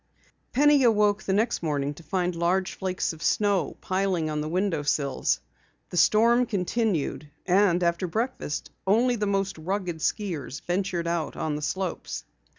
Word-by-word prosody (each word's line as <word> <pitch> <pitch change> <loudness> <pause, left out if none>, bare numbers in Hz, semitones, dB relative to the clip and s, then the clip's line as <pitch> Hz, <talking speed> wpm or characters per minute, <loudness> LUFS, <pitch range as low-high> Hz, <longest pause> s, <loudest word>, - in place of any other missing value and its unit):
Penny 290 +2 +5
awoke 210 -3 +3
the 190 - -1
next 220 +4 +1
morning 145 -3 -1
to 150 - -13
find 180 +2 -1
large 180 +3 +1
flakes 185 -2 -2
of 160 - -13
snow 200 -2 +1
piling 185 -4 0
on 150 0 -1
the 155 - -3
window 180 -2 0
sills. 140 -2 0 0.5
The - - -6
storm 235 +7 +4
continued 190 -7 -1 0.2
and 180 -1 +3
after 170 +2 +1
breakfast 220 - -3 0.2
only 240 +5 +3
the 210 -2 -1
most 195 -3 -1
rugged 180 0 -2
skiers 160 - -2
ventured 180 -1 -1
out 170 -2 -2
on 155 -2 -2
the 150 - -4
slopes. 190 +4 -3
185 Hz, 155 wpm, -26 LUFS, 165-205 Hz, 0.5 s, Penny